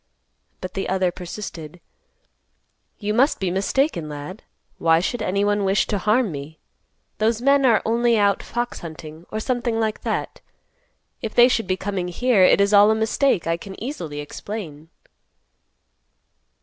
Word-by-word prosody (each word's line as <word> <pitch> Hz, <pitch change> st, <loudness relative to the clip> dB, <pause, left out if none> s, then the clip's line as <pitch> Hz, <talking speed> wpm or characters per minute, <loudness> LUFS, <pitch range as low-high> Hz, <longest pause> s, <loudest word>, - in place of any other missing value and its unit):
But 185 Hz, -, -6 dB
the 195 Hz, -, -3 dB
other 185 Hz, -1 st, +1 dB
persisted, 175 Hz, -3 st, -8 dB, 1.2 s
"You 210 Hz, 0 st, -2 dB
must 265 Hz, +7 st, +3 dB
be 185 Hz, -2 st, -1 dB
mistaken, 195 Hz, -, 0 dB
lad. 150 Hz, +7 st, -8 dB, 0.4 s
Why 165 Hz, 0 st, +4 dB
should 225 Hz, +6 st, -2 dB
any 200 Hz, 0 st, 0 dB
one 205 Hz, 0 st, +1 dB
wish 195 Hz, +1 st, +2 dB
to 205 Hz, -, -2 dB
harm 215 Hz, +2 st, +2 dB
me? 145 Hz, +2 st, -8 dB, 0.6 s
Those 220 Hz, +1 st, +1 dB
men 275 Hz, +1 st, +4 dB
are 225 Hz, -3 st, +3 dB
only 235 Hz, +1 st, +2 dB
out 200 Hz, -1 st, +2 dB
fox 240 Hz, +1 st, -4 dB
hunting, 160 Hz, 0 st, -10 dB
or 215 Hz, -, -3 dB
something 240 Hz, -1 st, -1 dB
like 220 Hz, -1 st, -1 dB
that. -, -, -3 dB, 0.8 s
If 225 Hz, -, -5 dB
they 240 Hz, 0 st, +8 dB
should 235 Hz, -3 st, 0 dB
be 185 Hz, -, 0 dB
coming 190 Hz, -2 st, -3 dB
here, 225 Hz, +4 st, +2 dB
it 185 Hz, -, +6 dB
is 200 Hz, +1 st, +3 dB
all 205 Hz, +1 st, +7 dB
a 220 Hz, -, +3 dB
mistake; 220 Hz, -, +1 dB
I 165 Hz, 0 st, 0 dB
can 190 Hz, +2 st, -10 dB
easily 170 Hz, -, -5 dB
explain." 160 Hz, -1 st, -8 dB
205 Hz, 155 wpm, -22 LUFS, 175-225 Hz, 1.2 s, they